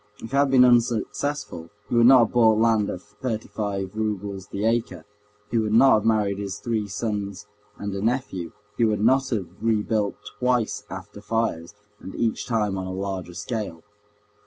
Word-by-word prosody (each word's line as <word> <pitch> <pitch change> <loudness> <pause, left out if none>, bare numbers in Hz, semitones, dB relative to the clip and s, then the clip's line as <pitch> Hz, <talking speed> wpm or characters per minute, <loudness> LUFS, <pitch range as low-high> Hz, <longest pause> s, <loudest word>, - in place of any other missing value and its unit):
If 115 - -10
it - - +1
had 140 0 +4
been 130 -1 +6
unsuccessful 120 - 0 0.2
he - - -6
would 120 0 +6
not 130 -2 +8
have - - -8
bought 110 -3 +5
land 110 -2 +3
at 90 - -5
thirty 110 +1 -5
five 100 -3 -3
roubles 100 -3 -3
the 100 +2 -3
acre, 110 -8 -1 0.5
he 115 - +2
would 110 -1 0
not 135 +3 +7
have 105 - +2
married 105 -3 +1
his 100 -1 -4
three 110 -3 -2
sons 105 -1 -4 0.3
and 100 -1 -4
a 100 - -3
nephew, 110 -7 -2 0.3
he 120 - +2
would 105 -2 +2
not 135 +4 +3
have 105 -7 -1 0.2
rebuilt 110 -2 0 0.2
twice 125 -3 0
after 95 +2 -9
fires, 105 -4 -2 0.2
and 95 - -9
each 115 -2 -1
time 105 -5 0
on 95 - -4
a - - -4
larger 95 -2 -4
scale. 105 -6 -4
105 Hz, 180 wpm, -24 LUFS, 100-115 Hz, 0.5 s, not